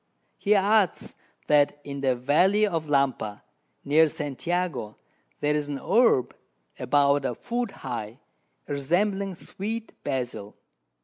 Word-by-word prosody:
He 210 Hz, +1 st, +3 dB
adds, 200 Hz, -1 st, +2 dB, 0.3 s
that 145 Hz, -1 st, +3 dB
in 140 Hz, -1 st, -6 dB
the 130 Hz, -2 st, +2 dB
Valley 180 Hz, +12 st, +3 dB
of 165 Hz, -6 st, -2 dB
Lampa, 135 Hz, -7 st, 0 dB, 0.4 s
near 155 Hz, +3 st, +5 dB
St. 145 Hz, -1 st, -5 dB
Jago, 175 Hz, -12 st, -2 dB, 0.4 s
there's 150 Hz, 0 st, +1 dB
an 145 Hz, -1 st, -3 dB
Herb, 225 Hz, -, +3 dB, 0.4 s
about 140 Hz, 0 st, +3 dB
a 125 Hz, -, -2 dB
Foot 240 Hz, -, -3 dB, 0.2 s
high, 115 Hz, +1 st, -5 dB, 0.5 s
resembling 190 Hz, +7 st, 0 dB
Sweet 220 Hz, +5 st, -5 dB
Basil. 120 Hz, -6 st, -4 dB
150 Hz, 115 wpm, -26 LUFS, 135-195 Hz, 0.5 s, near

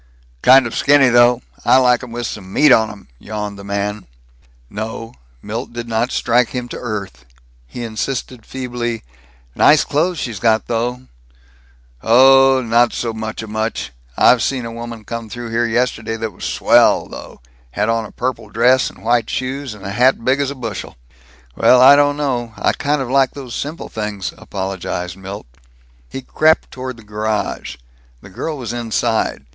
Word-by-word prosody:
"Kind 130 Hz, 0 st, +7 dB
of 115 Hz, -, -5 dB
skinny, 140 Hz, -2 st, +4 dB
though. 120 Hz, 0 st, +4 dB, 0.2 s
I -, -, +5 dB
like 125 Hz, -2 st, +3 dB
'em 125 Hz, -2 st, -9 dB
with 120 Hz, +1 st, -4 dB
some 95 Hz, -3 st, -7 dB
meat 150 Hz, +6 st, +4 dB
on 110 Hz, -3 st, +5 dB
'em," 105 Hz, -2 st, -12 dB
yawned 105 Hz, -1 st, -6 dB
the -, -, -9 dB
man. 100 Hz, +1 st, -3 dB, 0.6 s
No, 115 Hz, -, -6 dB, 0.3 s
Milt 115 Hz, +3 st, -5 dB
did 120 Hz, 0 st, -6 dB
not 115 Hz, +2 st, -1 dB
strike 120 Hz, 0 st, +2 dB
him 125 Hz, -1 st, -4 dB
to -, -, -6 dB
earth. 100 Hz, -, -6 dB, 0.4 s
He 120 Hz, -, -7 dB
insisted 115 Hz, +1 st, -4 dB
feebly, 120 Hz, -2 st, -4 dB, 0.5 s
"Nice 150 Hz, -, +5 dB
clothes 165 Hz, +5 st, 0 dB
she's 115 Hz, -8 st, -4 dB
got, 110 Hz, 0 st, +2 dB
though." 120 Hz, +2 st, -2 dB, 1.0 s
"Oh, 135 Hz, +2 st, +6 dB
not 115 Hz, +1 st, +3 dB
so 115 Hz, -2 st, -3 dB
muchamuch. 110 Hz, 0 st, -4 dB, 0.3 s
I -, -, +6 dB
seen 125 Hz, +1 st, -1 dB
a 115 Hz, -, -6 dB
woman 115 Hz, -1 st, -8 dB
come 115 Hz, -1 st, -6 dB
through 120 Hz, 0 st, -7 dB
here 120 Hz, +1 st, +1 dB
yesterday 115 Hz, -1 st, -1 dB
that 110 Hz, -1 st, -4 dB
was -, -, -8 dB
swell, 65 Hz, 0 st, +3 dB
though -, -, -10 dB, 0.3 s
had 105 Hz, +1 st, 0 dB
on 115 Hz, 0 st, 0 dB
a -, -, -10 dB
purple 125 Hz, -1 st, -4 dB
dress 125 Hz, +3 st, +3 dB
and -, -, -17 dB
white 115 Hz, 0 st, +1 dB
shoes 130 Hz, -2 st, -4 dB
and 100 Hz, -, -12 dB
a 100 Hz, -, -4 dB
hat 125 Hz, +2 st, +2 dB
big 135 Hz, +2 st, +2 dB
's 140 Hz, -, -1 dB
a 140 Hz, -, -6 dB
bushel." 115 Hz, -, -6 dB, 0.6 s
"Well, 125 Hz, -, +5 dB
I 135 Hz, +3 st, +9 dB
don't 145 Hz, 0 st, +3 dB
know, 120 Hz, -6 st, -2 dB
I -, -, +2 dB
kind 145 Hz, -1 st, -1 dB
of 125 Hz, -, -7 dB
like 135 Hz, -1 st, +2 dB
those 130 Hz, -4 st, -8 dB
simple 155 Hz, +4 st, -5 dB
things," 105 Hz, -3 st, -4 dB
apologized 95 Hz, -2 st, -5 dB
Milt. 95 Hz, +2 st, -8 dB, 0.6 s
He 135 Hz, -, -7 dB
crept 155 Hz, +4 st, +2 dB
toward 130 Hz, -1 st, -6 dB
the 115 Hz, -, -14 dB
garage. 105 Hz, -4 st, -3 dB, 0.5 s
The 100 Hz, -, -14 dB
girl 155 Hz, +10 st, -4 dB
was 120 Hz, -4 st, -5 dB
inside. 115 Hz, -1 st, -1 dB
120 Hz, 170 wpm, -18 LUFS, 110-130 Hz, 1.0 s, I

